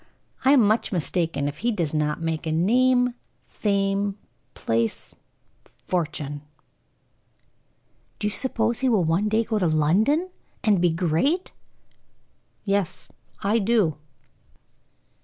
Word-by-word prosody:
I 265 +2 +5
am 250 -6 +5
much 215 +2 +1
mistaken 165 -5 -1
if 145 +1 -5
he 240 +2 +1
does 170 -9 -1
not 150 -1 0
make 165 -1 -3
a - - 0
name, 245 +8 +3 0.3
fame, 200 -1 -1 0.4
place, 115 0 -2 0.7
fortune." 150 -3 -3 1.8
"Do - - -4
you 210 - +1
suppose 230 -1 -1
he 265 - +2
will 215 -7 +3
one 170 +6 +1
day 220 +2 +2
go 220 -1 -1
to 180 - +1
London 210 - +2 0.3
and 205 -5 +3
be 175 - +4
great?" 175 - 0 1.1
"Yes, 195 -3 -1 0.3
I 210 +4 +2
do." 200 -8 +2
195 Hz, 120 wpm, -24 LUFS, 160-225 Hz, 1.8 s, I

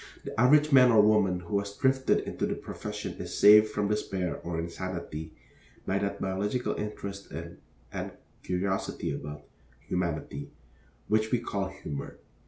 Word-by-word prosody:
The - - -5
average 150 +4 +5
man 130 -2 +8
or 110 - +6
woman 105 -4 +4
who 95 +4 -1
has 100 0 -5
drifted 130 -1 +3
into - - -2
the - - -1
profession - - -6
is - - -5
saved 105 +1 +8
from 105 -1 -1
despair 95 -4 -1
or 85 -1 -5
insanity 85 -2 -5 0.5
by 95 +1 +1
that 100 0 -2
biological 100 +6 -1
interest 100 -2 -6
in, 85 +1 -7 0.3
and - - -3 0.3
curiosity 95 -3 -2
about, 75 +1 -7 0.4
humanity, 75 -5 -2 0.6
which 110 +1 +2
we 125 - +4
call 100 -4 -2
humor. 75 -7 -7
100 Hz, 145 wpm, -29 LUFS, 85-105 Hz, 0.6 s, man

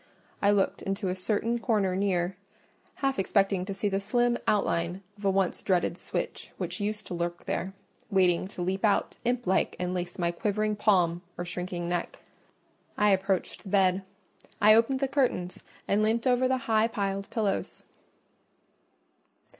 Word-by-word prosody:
I 200 - +4
looked 205 -2 +2
into 195 0 -2
a - - 0
certain 220 +5 -1
corner 205 -5 +1
near, 185 -2 0 0.7
half 270 -5 +1
expecting 195 -1 +2
to 195 - -4
see 205 - -1
the 195 -1 0
slim 240 +4 +1
outline 180 -2 +1
of 205 -1 -9
a - - +4
once 190 -2 +1
dreaded 180 -3 +1
switch - - -4
which - - -4
used 210 0 -2
to - - -6
lurk 175 0 -3
there, 190 +1 -3 0.3
waiting 185 -3 +3
to 180 -2 -5
leap 190 +2 -2
out 210 -2 +2
imp 245 0 0
like 190 +1 +1
and 180 0 -1
lace 180 -1 -4
my 170 -1 +1
quivering 210 +3 -1
palm 180 -5 +2 0.2
or 175 - -3
shrinking 175 0 -4
neck. 175 -1 -2 0.8
I 210 0 +4
approached 190 -1 0
the 195 - -10
bed; 190 -1 +3 0.6
I 215 0 +7
opened 235 +4 +3
the 275 - +2
curtains 255 -10 0 0.3
and 205 +2 +2
leant 225 +3 +1
over 255 0 +3
the 260 0 +2
high 220 0 +3
piled 200 -3 -3
pillows. 210 -4 -2
195 Hz, 160 wpm, -28 LUFS, 180-215 Hz, 0.8 s, I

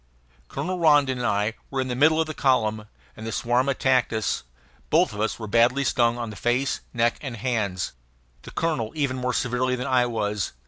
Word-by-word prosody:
Colonel 185 - -3
Rondon 145 -5 +4
and 120 - 0
I 105 +1 +1 0.2
were 135 - -3
in 130 - 0
the 125 - -2
middle 155 +4 +4
of 160 - +2
the 155 - -5
column, 110 -7 +1 0.3
and 110 - -8
the - - -3
swarm 120 +4 +1
attacked 130 -2 +2
us; 110 -4 -1 0.5
both 160 -5 +3
of 105 - -4
us 110 - -1
were 110 - -6
badly 120 +5 +3
stung 120 -2 +2
on 115 -2 -4
the - - -9
face, 125 +5 0
neck, 120 -1 +1
and 130 -6 -5
hands, 100 -6 -2 0.5
the - - -11
colonel 140 -10 -1
even 140 -4 0
more 125 0 -1
severely 125 +1 0
than 125 0 -4
I 125 -2 +2
was. 105 - -2
125 Hz, 200 wpm, -25 LUFS, 110-135 Hz, 0.5 s, Rondon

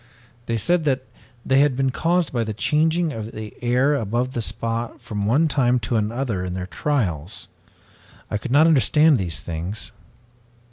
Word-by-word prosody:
They 115 - 0
said 175 - +1
that 130 -3 +1 0.4
they 135 +1 +4
had 145 -2 +3
been 135 0 +1
caused 170 +2 0
by 120 -2 +1
the 110 -1 -4
changing 160 +5 +1
of 110 -1 -6
the 110 -1 -7
air 125 +4 +2
above 120 0 -1
the 120 - -2
spot 115 +2 -3
from 105 - -6
the 100 - -1
one 145 +9 +3
time 125 -4 +2
to 110 +1 0
the 105 +1 -2
other 120 -8 -2
in 90 -1 -4
their 90 -1 -3
trials. 95 - -2 0.8
I 105 - -1
could 130 - -6
not 145 +5 +5
understand 155 -1 +4
these 85 -3 -2
things. 90 +5 -5
120 Hz, 180 wpm, -22 LUFS, 105-145 Hz, 0.8 s, not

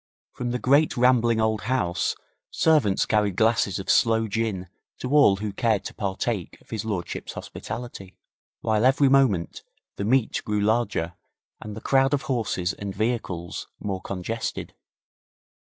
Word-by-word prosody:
From 120 - -4
the 125 - -1
great 140 +3 +3
rambling 120 -2 +4
old 110 -1 +1
house 115 -8 0 0.3
servants 145 -12 +3
carried 105 -3 +1
glasses 110 -3 +2
of 95 - -6
sloe 115 -1 +3
gin 105 -4 -2 0.3
to 130 - -5
all 145 -9 +6
who 105 0 -4
cared 110 -2 +1
to - - -6
partake 100 -1 -3
of - - -24
his 110 -1 -3
lordship's 100 -6 -4
hospitality, 100 -6 -8 0.4
while 110 0 +1
every 135 +2 +4
moment 125 -11 +2 0.4
the - - -2
meet 120 +2 +1
grew 105 -1 -1
larger 105 -5 0 0.5
and 105 -1 -8
the 110 - -8
crowd 135 +1 +3
of 140 - -4
horses 110 - -1
and 100 -1 -6
vehicles 100 -6 -3
more 95 -2 -3
congested. 100 +5 -4
110 Hz, 145 wpm, -25 LUFS, 100-125 Hz, 0.5 s, all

